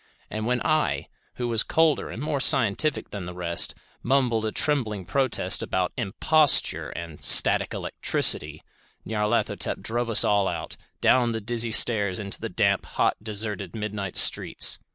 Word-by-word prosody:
And 110 +1 -4
when 125 0 -1
I, 80 - -1 0.3
who 120 - -4
was 115 -2 +2
colder 160 0 0
and 120 - -7
more 150 -2 -2
scientific 135 +1 +2
than 95 -4 -7
the 90 - -8
rest, 85 -1 -1 0.3
mumbled 120 -4 0
a - - -3
trembling 110 -11 -2
protest 115 -4 0
about 90 -1 -2
"imposture" 145 +7 +1
and 85 -3 -9
"static - - +5
electricity", 75 0 +1 0.4
Nyarlathotep 105 +1 -2
drave 120 +1 -3
us 115 - +5
all 100 -2 +1
out, 85 -3 -6 0.3
down 120 -2 +2
the 115 - -3
dizzy 115 +1 -2
stairs 105 -4 +2
into 100 -2 -5
the - - -4
damp, - - 0
hot, - - 0
deserted 105 -4 -4
midnight 105 -3 -5
streets. - - +2
110 Hz, 150 wpm, -24 LUFS, 100-125 Hz, 0.4 s, static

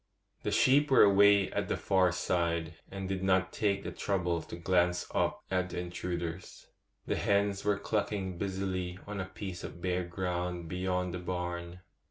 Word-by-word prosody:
The - - -2
sheep 130 +7 +4
were 135 - +7
away 100 -1 +6
at - - -1
the - - -1
far 95 -2 +3
side, 85 -1 0 0.2
and 95 -1 -5
did 95 -1 -2
not 95 0 +2
take 100 -2 0
the - - -4
trouble 90 -4 -1
to - - -8
glance 90 0 +1
up - - 0
at 90 -1 +1
the 90 - -4
intruders. 90 0 -5 0.4
The - - -1
hens 100 -1 +1
were 105 -1 +2
clucking 100 -3 -2
busily 95 -2 -2
on 105 -1 -5
a 95 - -2
piece 95 -1 -7
of - - -7
bare 90 0 0
ground 90 -1 -3
beyond 90 0 -1
the 90 - -3
barn. 90 0 -4
90 Hz, 170 wpm, -31 LUFS, 90-100 Hz, 0.4 s, were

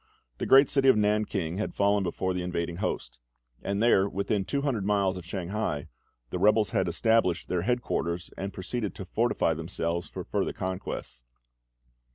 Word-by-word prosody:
The - - -2
great 135 +1 +7
city 135 -1 +2
of 130 - +7
Nan 105 0 +2
king 90 -3 -3
had 110 - -3
fallen 100 0 +3
before 95 +1 -1
the 90 - -2
invading 85 -1 -3
host; - - -3 0.4
and 100 +2 -1
there, 100 -4 +4
within 100 +1 -1
two 140 +5 -1
hundred 125 -8 0
miles 100 -2 +1
of 90 - -7
Shanghai, 90 -4 -3 0.4
the 90 - -2
rebels 105 +1 +4
had - - +1
established 90 -1 +2
their 90 -2 0
headquarters, 90 -6 -1
and 95 +1 -4
proceeded 105 +3 -4
to 95 - -7
fortify 110 -3 +1
themselves 85 +1 -3
for - - -6
further - - -1
conquests. 90 -9 -5
95 Hz, 170 wpm, -28 LUFS, 90-105 Hz, 0.4 s, great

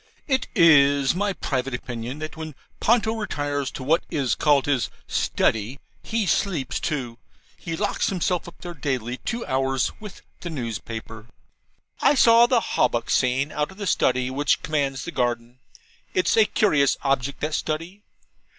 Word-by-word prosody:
It 265 -3 +1
is 145 - +5
my 205 +3 0
private 135 -7 -2
opinion 120 +2 -6
that 155 +2 -6
when 160 -2 -7 0.2
Ponto 225 -1 +2
retires 145 -10 -2
to - - -6
what 160 +5 +2
is 135 -5 0
called 145 -3 +3
his 140 -4 0 0.2
'Study,' 115 +5 0 0.2
he 225 -2 -1
sleeps 165 -6 0
too. 125 -7 -3 0.4
He 165 -2 -5
locks 205 +4 0
himself 180 -2 -1
up 175 - -11
there 175 -1 -6
daily 130 -5 -3
two 235 - -4
hours 135 -1 0
with 210 -2 -10 0.2
the 175 - -6
newspaper. 115 -4 -6 0.7
I 290 - +5
saw 235 -2 +6
the 240 -2 +3
HAWBUCK 120 - 0
scene 130 +3 +1
out 150 -1 -1
of 190 - -14
the 205 - -5
Study, 130 -7 +1
which 145 +2 +1
commands 140 -5 -1
the 175 - -5
garden. 120 -2 -2 0.6
It's 185 - +2
a 220 - +6
curious 150 - +2
object, 135 0 0
that 150 +1 -2
Study. 165 +7 -3
145 Hz, 155 wpm, -24 LUFS, 130-180 Hz, 0.7 s, saw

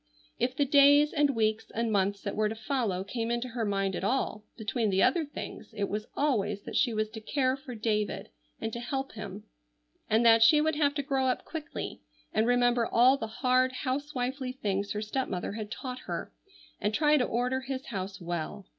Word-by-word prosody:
If 250 +2 0
the 285 - +2
days 285 +1 +6
and 290 -3 +2
weeks 220 0 0
and 230 0 0
months 200 0 +1
that 200 - -3
were 215 0 +2
to 220 - -4
follow 220 -5 -1
came 225 +3 -3
into 240 +1 -1
her 235 -1 -3
mind 195 -2 0
at - - -4
all 210 -1 0
between 220 0 -1
the 190 0 +3
other 340 -2 +3
things 280 -5 -8
it 200 -1 -1
was 210 +1 -3
always 210 -8 0
that - - -7
she 245 - +3
was 215 -1 0
to 220 -1 -8
care 260 +2 +1
for 270 -3 -9
David 210 -2 -1 0.3
and 225 0 -4
to 235 - -3
help 270 +2 -3
him, 210 -2 -7 0.7
and 225 +2 +3
that 225 -1 +7
she 300 +7 +7
would 315 +1 +2
have 290 -1 +2
to 285 - -1
grow 270 -2 +1
up 255 - -1
quickly; 310 -3 -6 0.3
and 220 +1 +2
remember 245 -1 +3
all 250 +3 +5
the 225 -5 -4
hard 255 +3 +2
housewifely 260 -1 -2
things 200 -5 -2
her 210 +1 -2
stepmother 215 -5 -2
had 210 0 -5
taught 255 +2 -5
her; - - -5 0.5
and 210 +1 0
try 300 +2 +4
to 255 - +2
order 250 +2 0
his 265 0 -5
house 195 -2 -5
well. 175 +2 -4
235 Hz, 200 wpm, -29 LUFS, 210-265 Hz, 0.7 s, that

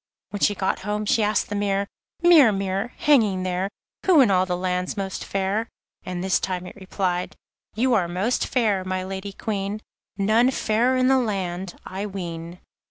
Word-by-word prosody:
When 205 - -4
she 205 - +3
got 190 0 -1
home 210 +1 -3
she 220 - +2
asked 210 -1 +1
the 205 - -3
mirror: 200 -1 0 0.4
'Mirror, 310 -10 +7
mirror, 195 +4 -2
hanging 215 -11 +3
there, 185 +1 -1 0.4
Who 355 -5 +6
in 235 -6 +4
all 185 0 +3
the 180 -1 -1
land's 180 +1 -2
most 195 -1 -3
fair?' 195 +4 -1 0.3
and 180 -1 -4
this 190 -1 +2
time 185 -1 -3
it - - -10
replied: 185 -2 -2 0.4
'You 250 +3 +2
are 185 -6 +2
most 190 +8 -1
fair, 215 -7 +1
my 185 0 -2
Lady 190 +1 -5
Queen, 200 0 -3 0.4
None 220 +5 +3
fairer 245 +1 +1
in 255 0 +3
the 265 0 +4
land, 190 -5 -3
I 195 +2 -4
ween. 170 -3 -6
195 Hz, 175 wpm, -24 LUFS, 185-215 Hz, 0.4 s, Mirror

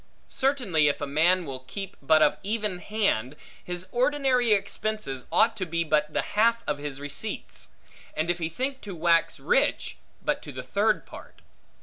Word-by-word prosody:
Certainly, 245 - +2
if 145 - +1
a 145 - -2
man 170 +6 +3
will 135 -3 -5
keep 195 +9 -7
but 155 +3 +5
of 150 - +3
even 210 -3 -2
hand, 180 - 0 0.3
his 180 0 -4
ordinary 255 -2 +2
expenses 205 -9 -1
ought 220 +2 +4
to 185 - -2
be 170 +1 0
but 150 -1 +2
to 150 - -23
the - - +2
half 230 +2 +3
of 145 -1 -2
his 145 -2 -5
receipts; 145 0 -5 0.5
and 155 - 0
if 175 - -4
he 160 -1 -1
think 265 - -3
to 200 -3 -7
wax 165 0 +2
rich, - - +1 0.3
but - - 0
to - - -8
the - - -6
third - - +1
part. - - -13
180 Hz, 180 wpm, -27 LUFS, 150-220 Hz, 0.5 s, but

